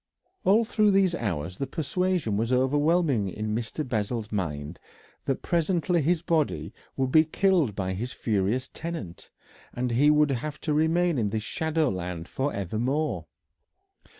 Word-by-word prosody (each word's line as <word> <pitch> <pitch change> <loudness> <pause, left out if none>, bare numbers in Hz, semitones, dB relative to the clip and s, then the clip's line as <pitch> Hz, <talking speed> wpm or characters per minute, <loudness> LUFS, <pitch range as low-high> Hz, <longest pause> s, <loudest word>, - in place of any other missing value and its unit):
All 215 +4 +5
through 215 -1 +3
those 195 -2 +3
hours 90 - -3
the 135 - -2
persuasion 165 - -1
was 115 +4 0
overwhelming 145 - +2
in 105 +3 -3
Mr. 120 +6 -3
Bessel's 110 -1 -2
mind 80 -5 -3 0.5
that 135 - -1
presently 170 0 +1
his 165 +3 +1
body 165 -4 0 0.2
would 130 -1 0
be 155 +2 +7
killed 165 - +2
by 95 -2 -2
his 120 +7 -4
furious 110 +2 0
tenant, 160 - -7 0.4
and 125 0 -2
he 135 +6 +4
would 150 -1 +4
have 145 +4 -3
to 155 - -1
remain 160 0 +2
in 105 -3 +1
this 110 +1 -2
shadow 160 +2 0
land 90 -3 -4
for 140 +2 -2
evermore. 110 - -2
135 Hz, 150 wpm, -27 LUFS, 105-160 Hz, 0.5 s, be